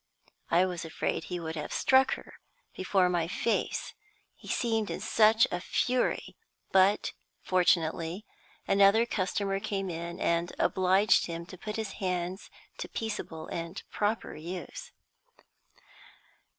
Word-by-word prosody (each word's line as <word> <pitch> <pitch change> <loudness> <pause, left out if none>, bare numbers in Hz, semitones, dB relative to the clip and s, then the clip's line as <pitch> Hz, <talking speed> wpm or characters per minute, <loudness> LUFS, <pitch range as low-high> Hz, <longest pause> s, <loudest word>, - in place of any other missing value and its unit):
I 175 +2 +4
was 180 -2 -4
afraid 165 - -2
he 180 -1 -4
would 160 -1 -5
have 150 - -5
struck 265 0 +4
her - - -13 0.4
before 185 0 +2
my 175 -2 0
face, 225 +6 -1 0.4
he - - -16
seemed 225 -3 0
in - - -3
such 220 +1 +5
a 175 - -1
fury; 250 +6 0 0.4
but, 190 +2 +4 0.3
fortunately, 175 +1 +1 0.4
another 200 +3 +5
customer 195 -2 -1
came 195 -3 -3
in, 170 +1 -5
and 170 +1 0
obliged 190 +2 +3
him 170 0 -5
to 185 - -10
put 210 +4 -6
his 220 -3 -3
hands 180 0 -2 0.3
to - - -5
peaceable 205 -8 -4
and 170 +2 -5
proper 210 +2 -1
use. 180 - -7
185 Hz, 125 wpm, -30 LUFS, 170-210 Hz, 0.4 s, such